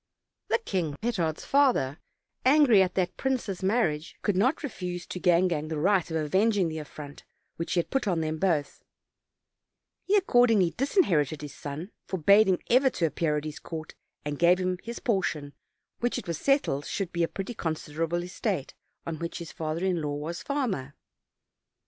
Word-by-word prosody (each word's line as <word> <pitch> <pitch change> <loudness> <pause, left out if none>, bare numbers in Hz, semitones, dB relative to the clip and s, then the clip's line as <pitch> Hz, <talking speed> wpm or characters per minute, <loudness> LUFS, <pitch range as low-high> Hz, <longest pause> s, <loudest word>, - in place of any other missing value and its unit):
The - - +3
king, 180 - -2
Petard's 185 -9 -1
father, 250 - +2 0.4
angry 260 -6 +6
at 185 -1 +1
that 185 -2 0
prince's 250 -8 -2
mar 215 +6 +3
riage, 150 +1 -4
could 205 - +1
not 255 - +2
refuse 180 -9 -4
to 180 - -6
Gangan 170 -3 +2
the 160 - -2
right 185 +2 +2
of 160 - -1
avenging 190 +4 +2
the 160 0 -4
affront 145 -1 -9 0.3
which 165 - -3
he 175 - +3
had - - -15
put 270 -5 0
on 175 -4 +1
them 155 0 -2
both; 160 -6 0 1.2
he 405 - +3
accord 245 - +4
ingly 190 -6 +3
disinherited 170 - +1
his 145 - -7
son, 155 +7 -7 0.2
forbade 200 +4 +5
him 185 -2 +3
ever 260 +2 +5
to 175 - -1
appear 150 0 0
at 150 - -3
his 155 -1 -6
court, 160 -2 -7 0.3
and 145 -1 -3
gave 175 +1 +5
him 185 0 -1
his 235 +1 -6
portion, 165 - -1 0.5
which 240 +1 0
it 245 - -5
was 170 -3 -3
settled 275 - +1
should 195 -3 -3
be 170 - -1
a 165 - +3
pretty 195 +7 -5
considerable 165 -1 -2
estate, 180 - -3 0.3
on 160 -2 -4
which 170 0 -4
his 170 -2 -7
father 160 +3 -3
in 180 -3 +1
law 145 -1 -2
was 155 +4 -5
farmer. 220 - -2
175 Hz, 180 wpm, -28 LUFS, 155-215 Hz, 1.2 s, angry